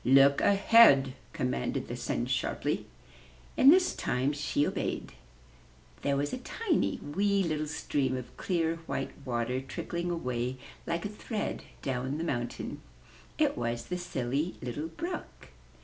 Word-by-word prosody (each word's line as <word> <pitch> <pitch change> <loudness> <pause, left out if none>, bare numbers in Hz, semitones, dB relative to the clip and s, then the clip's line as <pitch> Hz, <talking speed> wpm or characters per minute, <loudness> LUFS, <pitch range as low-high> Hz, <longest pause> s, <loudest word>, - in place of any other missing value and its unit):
*'Look 135 +2 +6
ahead/' 200 - +6 0.2
commanded 65 0 -2
the - - -4
Sun - - -2
sharply. - - -1 0.7
And 270 - +8
this 365 +2 +4
time 130 +4 0
she 145 0 0
obeyed. - - -2 0.9
There 140 -1 +1
was 145 +1 -1
a - - -2
tiny, 355 - 0
wee 200 +6 +1
little 155 -3 -1
stream 140 -3 -1
of 125 - -8
clear, 165 -3 0
white 135 - -2
water 125 +1 -1
trickling 170 +6 -4
away 125 -6 -2 0.3
like 170 +2 -1
a - - +1
thread 210 +1 -4 0.2
down 130 +2 -1
the 165 - -2
mountain. 120 -7 -3 0.6
It - - +2
was 120 0 -2
the 180 - -3
Silly 140 0 -2
Little 125 +6 -4
Brook. 345 - -6
145 Hz, 135 wpm, -30 LUFS, 130-180 Hz, 0.9 s, And